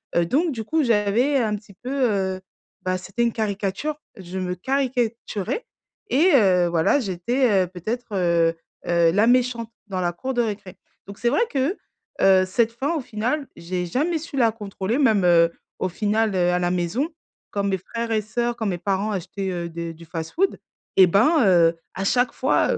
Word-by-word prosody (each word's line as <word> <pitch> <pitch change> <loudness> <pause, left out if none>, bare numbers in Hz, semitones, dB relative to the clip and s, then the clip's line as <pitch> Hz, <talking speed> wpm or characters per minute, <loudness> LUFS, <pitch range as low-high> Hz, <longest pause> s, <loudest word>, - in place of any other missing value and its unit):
heu, 170 - +3
donc 305 - +1
du 225 - -4
coup, 315 +2 +1
j'avais 235 +5 +2
un 215 -4 +1
petit 205 -1 -16
peu, 255 - -4 0.2
heu, 190 -1 -1 0.4
bah, 185 0 0
c'était 190 +6 -3
une 235 - +1
caricature, 215 +8 -2 0.2
je 185 0 -6
me 180 -1 -2
caricaturais 245 - -2 0.4
et 335 +8 +4
heu, 185 -7 +4
voilà, 170 - +2
j'étais, 200 +2 +1
heu, - - -10
peut-être, 215 +8 -5
heu 170 -2 +2 0.3
heu, 170 -1 +4
la 210 +4 +4
méchante 240 -2 +2 0.2
dans 190 -2 -3
la 175 -1 0
cour 260 +9 -4
de 245 - +2
récré, 205 -4 -4 0.3
donc 200 0 -10
c'est 240 - +2
vrai 285 - +2
que, 280 +8 0 0.4
heu, 190 -1 +5
cette 225 +4 +1
faim, 280 +7 -1
au 300 - -1
final, 245 +6 -2
j'ai 180 +1 -3
jamais 315 - 0
su 295 -3 -7
la 230 -3 +4
contrôler 205 +1 -3
même, 215 -9 +3
heu, 170 -1 +5 0.3
au 185 - 0
final, 215 +2 0
heu, 180 -1 +2
à 180 - +1
la 175 0 0
maison, 180 - -1 0.4
quand 200 - -1
mes 195 -1 0
frères 230 +4 -5
et 215 -1 +2
sœurs, 240 +3 -2
quand 220 - -3
mes 180 -2 -1
parents 200 +2 -1
achetaient, 195 +1 -4
heu, 170 -1 -4
des 170 0 -5
du 165 - -14
fast-food, 165 - -2 0.4
eh 190 -1 +8
ben, 230 - +4
heu, 170 -3 +4 0.2
à 190 - -3
chaque 245 +2 +2
fois, 260 - +2
heu, - - -1
205 Hz, 190 wpm, -23 LUFS, 180-245 Hz, 0.4 s, eh